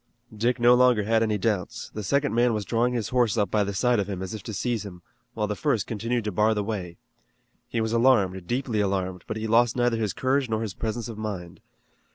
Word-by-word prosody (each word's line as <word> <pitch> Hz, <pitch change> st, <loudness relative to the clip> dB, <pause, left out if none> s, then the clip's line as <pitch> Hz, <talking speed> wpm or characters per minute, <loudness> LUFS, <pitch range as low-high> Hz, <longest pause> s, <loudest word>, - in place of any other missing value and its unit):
Dick 120 Hz, +4 st, 0 dB
no 120 Hz, +1 st, +6 dB
longer 125 Hz, -3 st, +4 dB
had 110 Hz, +2 st, +2 dB
any 110 Hz, -2 st, +1 dB
doubts. 100 Hz, -3 st, -2 dB
The 105 Hz, -, -4 dB
second 140 Hz, +8 st, 0 dB
man 120 Hz, 0 st, +3 dB
was 105 Hz, -2 st, -3 dB
drawing 120 Hz, +3 st, +1 dB
his 115 Hz, -4 st, -2 dB
horse 120 Hz, -3 st, +2 dB
up 105 Hz, -2 st, +1 dB
by 105 Hz, -1 st, +2 dB
the 100 Hz, -, -3 dB
side 125 Hz, +2 st, +2 dB
of 100 Hz, 0 st, -2 dB
him, 95 Hz, -2 st, -4 dB
as 95 Hz, -, -5 dB
if 110 Hz, -, -6 dB
to 110 Hz, -, -7 dB
seize 115 Hz, +1 st, -2 dB
him, 90 Hz, -4 st, -10 dB, 0.3 s
while 105 Hz, -2 st, 0 dB
the 105 Hz, 0 st, -3 dB
first 115 Hz, -6 st, 0 dB
continued 115 Hz, +2 st, -2 dB
to 105 Hz, -, -2 dB
bar 105 Hz, +4 st, +2 dB
the 105 Hz, -, -1 dB
way. 95 Hz, -5 st, -5 dB, 0.7 s
He 115 Hz, -, -2 dB
was 110 Hz, 0 st, -1 dB
alarmed, 100 Hz, -7 st, +3 dB
deeply 120 Hz, -3 st, -1 dB
alarmed, 95 Hz, -2 st, -2 dB
but -, -, -4 dB
he 110 Hz, -, -4 dB
lost 115 Hz, +1 st, +3 dB
neither 120 Hz, -2 st, +1 dB
his 105 Hz, -5 st, -1 dB
courage 130 Hz, 0 st, 0 dB
nor 110 Hz, 0 st, -1 dB
his 105 Hz, -4 st, -4 dB
presence 110 Hz, +2 st, -3 dB
of 110 Hz, -2 st, -8 dB
mind. 95 Hz, -5 st, -6 dB
110 Hz, 235 wpm, -26 LUFS, 100-120 Hz, 0.7 s, no